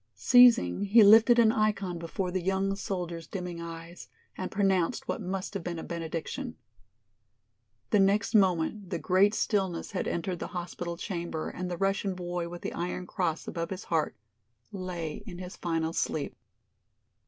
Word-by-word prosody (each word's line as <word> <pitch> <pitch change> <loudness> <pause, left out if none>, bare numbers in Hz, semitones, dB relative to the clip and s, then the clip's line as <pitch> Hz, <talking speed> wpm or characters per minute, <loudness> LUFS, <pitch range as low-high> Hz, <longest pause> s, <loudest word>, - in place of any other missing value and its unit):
Ceasing, 240 - +5
he 215 +3 +7
lifted 225 +4 +7
an 225 -2 +6
ikon 200 -5 0
before 180 +2 -3
the 185 0 -1
young 195 +2 0
soldier's 175 -4 -4
dimming 180 -3 -5
eyes, 165 +1 -9 0.3
and 185 - -4
pronounced 195 0 +1
what - - -2
must 190 +1 -4
have 195 -4 -4
been 170 -1 -4
a - - -5
benediction. 170 - -5 1.4
The 210 - +5
next 200 +4 +3
moment 190 -1 +2
the 180 - -2
great 195 +5 +3
stillness 190 -6 -1
had 190 - -2
entered 175 +1 -2
the - - -4
hospital 175 0 -5
chamber 170 -3 -4
and 180 0 -5
the 175 - -3
Russian 195 0 0
boy 175 -1 -3
with 175 0 -9
the - - -3
iron 180 +1 -3
cross 170 -3 -2
above 165 0 -3
his 190 0 -5
heart 160 -2 0 0.6
lay 175 -5 -5
in 180 -4 -7
his 180 0 -7
final 165 -1 -1
sleep. 150 -3 -2
180 Hz, 160 wpm, -29 LUFS, 170-195 Hz, 1.4 s, he